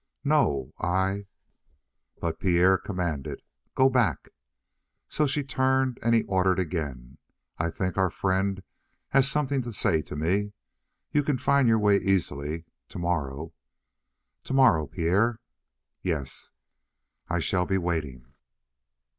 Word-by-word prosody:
"No 140 - +1
I 95 +3 0 0.5
" 70 -2 -44
But 80 -1 -2
Pierre 90 +1 +4
commanded: 85 -9 -4 0.3
"Go 130 - +5
back." 125 -4 +1 0.8
So 150 - 0
she 145 +2 0
turned, 130 -1 +1
and 115 0 +3
he 115 - +3
ordered 95 0 +1
again: 70 -8 -4 0.4
"I 85 +1 0
think 95 +2 -3
our 95 -1 +3
friend 95 +2 -1 0.5
has 135 0 +4
something 140 -2 0
to 120 -1 -6
say 100 -7 +1
to - - -8
me. 95 +7 0 0.6
You 150 - +3
can 145 -2 0
find 135 0 +3
your 110 -1 +5
way 105 -2 +4
easily. 80 -5 -1 0.2
Tomorrow 80 -3 -3 0.4
" - - -56
"Tomorrow, 125 - +4
Pierre?" 100 +7 +1 0.6
"Yes." 80 -8 -3 0.8
"I 85 - 0
shall 90 +1 0
be 95 - +1
waiting." 80 -9 -3
95 Hz, 125 wpm, -27 LUFS, 80-120 Hz, 0.8 s, Go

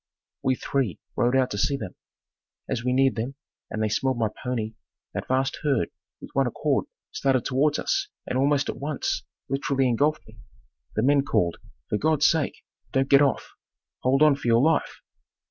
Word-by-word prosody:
We 130 0 +2
three 125 - -1 0.2
rode 120 +2 +2
out 130 -1 +2
to 105 - -2
see 140 +6 +1
them. 95 - -6 0.7
As 115 - -2
we 125 - +1
neared 135 +1 +4
them, 125 +5 -3 0.3
and 110 - -2
they - - +2
smelled 130 +4 0
my 110 -2 +1
pony, 115 -3 -2 0.4
that - - -4
vast 135 +1 0
herd, 140 -6 +1 0.3
with - - -11
one - - +2
accord, - - 0 0.2
started 130 -3 +1
towards 145 +3 +2
us 390 +1 0 0.2
and - - -3
almost 140 +2 +2
at - - -3
once 145 0 -2 0.3
literally 135 0 +1
engulfed 145 +6 +1
me. 110 0 -16 0.6
The 110 - +1
men 140 +2 +4
called, 85 -10 +1 0.3
"For 105 - -1
God's 155 -1 +2
sake, 160 -4 +1 0.3
don't 135 0 +1
get 140 0 +8
off. 140 -2 +1 0.5
Hold 135 +3 +3
on 150 -2 +6
for 140 - -6
your 115 +2 +5
life." 160 +1 +1
135 Hz, 180 wpm, -25 LUFS, 120-140 Hz, 0.7 s, get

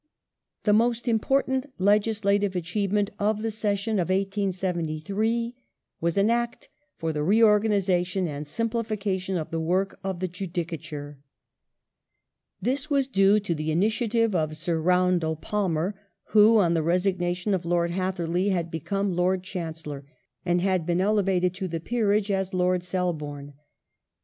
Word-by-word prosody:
The 210 - +3
most 235 +3 +2
important 265 +4 +1
legislative 205 0 +2
achievement 200 +3 0
of 210 +1 0
the 225 - -1
session 210 0 -1
of 175 - 0
The 190 +1 +2
Judi 200 +1 -2
1873 190 +6 -1 0.5
was 170 +1 0
an 200 +3 +4
Act 235 0 -2 0.3
for 165 -1 -2
the 150 - -2
reorganization 195 -2 +3
and 145 -1 -5
simplification 210 -3 -2
of 155 - -5
the 165 - -1
work 185 +4 +1
^^^.^ - - -18
^3^^ - - -39
of 190 -2 -3
the 185 - -1
Judicature. 165 -5 -6 1.4
This 275 +5 -1
was 275 -3 +2
due 195 -3 +4
to 195 -4 -1
the 155 0 -3
initiative 220 +5 +1
of 155 -3 -1
Sir 165 +1 -1
Roundell 180 -2 +2
Palmer 180 +1 -1 0.4
who, 220 +1 +6
on 175 -5 +3
the 165 - +2
resignation 180 +2 0
of 185 -2 0
Lord 170 0 +1
Hatherley, 185 0 -1
had 170 -3 -1
become 195 +4 -2
Lord 180 +1 +1
Chancellor 160 -6 -6 0.4
and 175 0 +1 0.2
been 175 +2 0
elevated 190 -3 +2
to 190 0 -4
the 165 -1 -3
Peerage 210 +1 +1
as 190 -1 -1
Lord 180 0 +2
Selborne. 150 -6 -3
185 Hz, 145 wpm, -26 LUFS, 170-210 Hz, 1.4 s, who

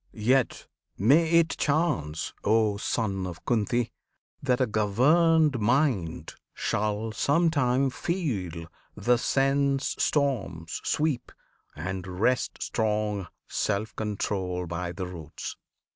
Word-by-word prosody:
Yet 125 +4 +1 0.3
may 145 - +4
it 165 0 +4
chance, 140 - 0
O 110 -1 +3
Son 100 -3 -1
of 85 -2 -9
Kunti! 120 +1 +1 0.5
that 125 -3 +1
a 130 - +4
governed 140 +8 +3
mind 105 - +1 0.2
Shall 105 +1 -1
some 165 +8 +2
time 135 -2 +2
feel 105 - -3 0.3
the 120 +4 +2
sense 135 +2 +1
storms 100 - 0
sweep, 150 -5 0 0.4
and 90 +4 -4
wrest 125 +4 +1
Strong 105 -3 -1 0.2
self 105 0 -1
control 95 -4 -2
by 85 +1 -4
the 95 +1 -5
roots. 85 -4 -7
110 Hz, 105 wpm, -27 LUFS, 95-140 Hz, 0.5 s, may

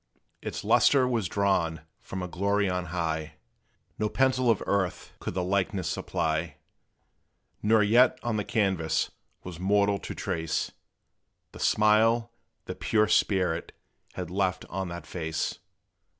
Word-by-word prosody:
Its - - -5
lustre 135 -3 +4
was 115 -6 0
drawn 85 -4 0 0.2
from 95 -1 -6
a - - -3
glory 100 +3 0
on 90 -1 -1
high: 80 -2 -3 0.6
No 105 - +1
pencil 130 -1 +2
of 115 - +2
earth 95 -3 -1
could - - -5
the 90 - 0
likeness 95 -1 0
supply; 80 0 -2 1.1
Nor 110 0 +4
yet 120 +5 +5
on 120 -2 -1
the 105 - 0
canvass 95 -9 0 0.3
was 90 -2 -8
mortal 100 +1 +2
to - - -7
trace 80 0 -2 0.8
A - - -11
smile 115 +2 +3 0.3
the - - -4
pure 110 -1 +1
spirit 90 -5 +1 0.4
had 90 -2 -5
left 95 -1 0
on 95 +1 -2
that 85 0 -7
face. 80 -2 -3
95 Hz, 135 wpm, -28 LUFS, 85-105 Hz, 1.1 s, yet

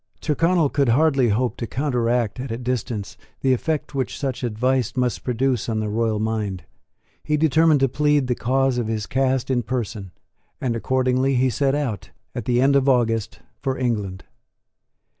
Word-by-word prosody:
Tyrconnel 165 0 +2
could 140 -3 +1
hardly 135 -1 +3
hope 115 +2 0
to 115 - -4
counteract 125 -4 0
at 130 +1 -5
a 115 - -3
distance 120 -4 -3 0.2
the 130 -1 +3
effect 155 +5 -2
which 135 -2 -2
such 135 -3 -3
advice 125 +1 0
must 125 -1 0
produce 125 -1 0
on 110 -1 -1
the 105 -1 -2
royal 110 0 0
mind. 105 -5 -2 0.6
He 150 0 0
determined 160 -1 +4
to 135 - +5
plead 145 +1 +2
the 125 - 0
cause 130 +1 +1
of 115 - -2
his 110 -2 -2
caste 130 -1 0
in 125 -2 +2
person; 110 -4 -4 0.5
and 120 -3 -1
accordingly 130 +2 +1
he 130 +1 +2
set 135 +2 +1
out, 125 -10 -3 0.2
at 120 - -5
the 125 0 +2
end 140 +1 +4
of 140 0 +3
August, 115 -4 +1 0.2
for 135 -1 -2
England. 105 -7 -2
125 Hz, 170 wpm, -22 LUFS, 115-135 Hz, 0.6 s, to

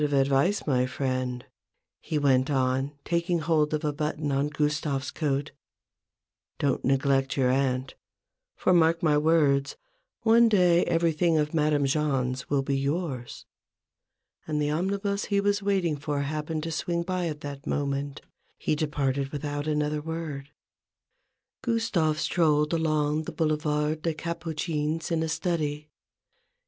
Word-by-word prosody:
of 145 -1 +1
advice, 140 +8 +2
my 130 -3 +2
friend," 130 -1 -2 0.5
he 155 - -3
went 135 -2 +3
on, 130 0 +1
taking 170 0 0
hold 155 -2 +1
of 155 -1 -1
a 150 - 0
button 150 0 -2
on 140 +1 +1
Gustave's 150 -2 -1
coat: 145 -3 -1 0.5
" - - -63
don't 140 -2 0
neglect 135 0 +1
your 125 -2 +3
aunt; 130 -1 0 0.6
for, 185 - +2
mark 165 -1 +3
my 155 -2 +4
words, 150 -3 +2 0.5
one 230 +1 +6
day 180 -4 +4
everything 165 -1 +2
of 150 +1 0
Madame 150 -2 +2
Jahn's 135 -3 0
will 140 -1 +1
be 135 0 0
yours! 140 -3 -3 0.5
" - - -45
And 150 -1 -1
the 150 0 0
omnibus 200 +5 -1
he 200 -1 +1
was 205 +1 +1
waiting 190 -6 +1
for 145 0 -2
happen 155 +2 -3
ing - - -2
to 165 +1 -4
swing 170 +1 -1
by 180 -1 -1
at 150 -2 -5
that 140 -1 -7
moment, 140 0 -2 0.4
he - - -1
departed 140 -3 -1
without 145 0 -4
another 150 0 0
word. 155 -3 -5 1.1
Gustave 210 -10 +1
strolled 150 -3 +2
along 155 -1 +1
the - - -5
Boulevard 150 -1 0
des 165 -1 -1
Capucines 160 -1 -3
in 165 -1 +1
a 160 - -1
study. 155 -3 -2
150 Hz, 145 wpm, -27 LUFS, 140-165 Hz, 1.1 s, one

